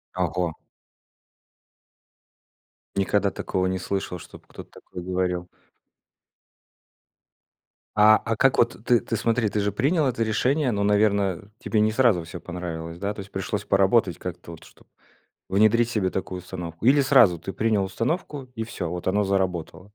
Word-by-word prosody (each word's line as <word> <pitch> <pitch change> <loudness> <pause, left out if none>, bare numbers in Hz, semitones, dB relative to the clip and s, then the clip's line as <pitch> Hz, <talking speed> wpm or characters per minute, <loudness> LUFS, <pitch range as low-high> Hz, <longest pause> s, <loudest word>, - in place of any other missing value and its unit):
Ого. 90 -1 -1 2.4
Никогда 100 0 +1
такого 95 0 -2
не 95 0 -1
слышал, 95 -2 -3
чтобы - - -13
кто-то - - -11
такое 90 - -9
говорил. 90 -1 -2 2.5
А 110 +1 +7
а 115 -1 0
как 135 +2 +3
вот, 120 -2 +1
ты 120 -2 +4
ты 115 - -3
смотри, 115 0 +1
ты 105 - -1
же 100 0 0
принял 145 - +1
это 115 -2 0
решение, 125 +5 +1
но, 100 -1 -1
наверно, 100 -2 +1
тебе 110 -2 0
не 110 0 +3
сразу 110 -8 +3
всё 85 +1 -8
понравилось, 85 -1 -6
да? 100 +1 -2
То 105 - -11
есть, 100 +1 -9
пришлось 100 +1 -3
поработать 100 -2 +3
как-то, 90 -1 -7
вот, 80 - -12
чтоб - - -20 0.6
внедрить 110 +4 +3
себе 100 -6 0
такую 95 -1 -4
установку, 90 +1 -7
или 140 +2 +6
сразу- 125 -10 +5
ты 95 - -6
принял 110 -3 +1
установку 130 - -3
и 115 - -3
всё, 95 -6 -5
вот, 90 +1 -5
оно 100 +2 +2
заработало? 95 -1 -2
100 Hz, 150 wpm, -24 LUFS, 90-115 Hz, 2.5 s, А